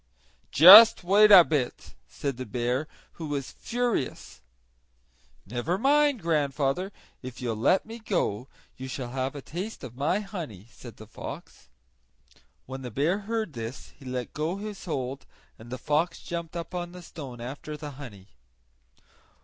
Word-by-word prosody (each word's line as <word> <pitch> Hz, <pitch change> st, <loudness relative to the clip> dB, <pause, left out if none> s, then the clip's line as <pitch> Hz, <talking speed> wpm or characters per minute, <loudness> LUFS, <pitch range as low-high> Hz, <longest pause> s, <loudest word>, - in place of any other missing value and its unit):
"Just 195 Hz, +8 st, +10 dB
wait 205 Hz, +4 st, +5 dB
a 190 Hz, -4 st, +10 dB
bit," 145 Hz, -7 st, -3 dB
said 140 Hz, -4 st, -4 dB
the 130 Hz, -, -5 dB
bear, 125 Hz, +6 st, -1 dB, 0.3 s
who 160 Hz, -, -4 dB
was 140 Hz, -3 st, -4 dB
furious. 240 Hz, -, -3 dB, 1.0 s
"Never 125 Hz, -, -2 dB
mind, 285 Hz, -, +2 dB
grandfather; 150 Hz, +2 st, 0 dB, 0.3 s
if 130 Hz, -1 st, -9 dB
you'll 120 Hz, -3 st, -2 dB
let 125 Hz, -, +2 dB
me 225 Hz, +1 st, -9 dB
go 155 Hz, -, -2 dB, 0.3 s
you 130 Hz, -, -7 dB
shall 125 Hz, -2 st, -5 dB
have 130 Hz, +2 st, -3 dB
a 140 Hz, -, -7 dB
taste 190 Hz, +7 st, -6 dB
of 120 Hz, -, -9 dB
my 150 Hz, +9 st, 0 dB
honey," 170 Hz, -, -7 dB
said 120 Hz, -4 st, -12 dB
the 110 Hz, -, -11 dB
fox. 110 Hz, -, -10 dB, 1.0 s
When 130 Hz, +1 st, -7 dB
the 125 Hz, -, -6 dB
bear 150 Hz, -, 0 dB
heard 220 Hz, -7 st, -2 dB
this 115 Hz, +2 st, -7 dB
he 140 Hz, -, -18 dB
let 125 Hz, -2 st, -5 dB
go 155 Hz, +4 st, -2 dB
his 210 Hz, -1 st, -7 dB
hold 135 Hz, -5 st, -4 dB, 0.3 s
and 115 Hz, +1 st, -12 dB
the 130 Hz, -, -4 dB
fox 150 Hz, +7 st, -1 dB
jumped 170 Hz, -1 st, -6 dB
up 170 Hz, +1 st, -6 dB
on 175 Hz, -1 st, -4 dB
the 180 Hz, -1 st, -10 dB
stone 135 Hz, -7 st, -9 dB
after 140 Hz, +5 st, -7 dB
the 150 Hz, -1 st, -7 dB
honey. 115 Hz, -8 st, -11 dB
145 Hz, 155 wpm, -27 LUFS, 125-180 Hz, 1.0 s, Just